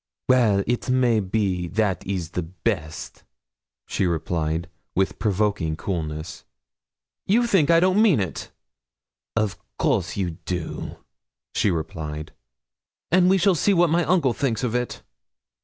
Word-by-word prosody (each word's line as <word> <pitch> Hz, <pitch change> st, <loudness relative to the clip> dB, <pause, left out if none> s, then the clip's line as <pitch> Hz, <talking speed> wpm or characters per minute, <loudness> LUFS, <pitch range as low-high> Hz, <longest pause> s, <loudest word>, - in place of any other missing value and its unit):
'Well, 110 Hz, -6 st, +4 dB
it 120 Hz, +2 st, -1 dB
may 125 Hz, -3 st, +3 dB
be 95 Hz, -3 st, -1 dB
that 100 Hz, 0 st, 0 dB
is 90 Hz, -4 st, -3 dB
the 90 Hz, -, -2 dB
best,' 85 Hz, -1 st, -4 dB, 0.6 s
she 95 Hz, -, 0 dB
replied, 80 Hz, 0 st, -1 dB, 0.3 s
with 95 Hz, +1 st, 0 dB
provoking 100 Hz, -6 st, 0 dB
coolness. 80 Hz, -2 st, -4 dB, 0.8 s
'You 235 Hz, +5 st, +4 dB
think 190 Hz, -11 st, +3 dB
I 165 Hz, 0 st, +6 dB
don't 185 Hz, +4 st, +3 dB
mean 200 Hz, -, +5 dB
it?' 95 Hz, -4 st, -4 dB, 0.9 s
'Of 110 Hz, -3 st, 0 dB, 0.2 s
course 90 Hz, +1 st, 0 dB
you 90 Hz, -5 st, -2 dB
do,' 90 Hz, -3 st, -4 dB, 0.6 s
she -, -, +2 dB
replied. 80 Hz, -2 st, -4 dB, 0.8 s
'And 180 Hz, +1 st, +5 dB
we 190 Hz, -, +5 dB
shall 195 Hz, +1 st, +4 dB
see 195 Hz, +4 st, +2 dB
what 175 Hz, -2 st, +4 dB
my 170 Hz, +1 st, +3 dB
uncle 160 Hz, -8 st, +3 dB
thinks 125 Hz, -4 st, -1 dB
of 120 Hz, -2 st, -1 dB
it.' 125 Hz, 0 st, -2 dB
100 Hz, 135 wpm, -24 LUFS, 85-135 Hz, 0.9 s, I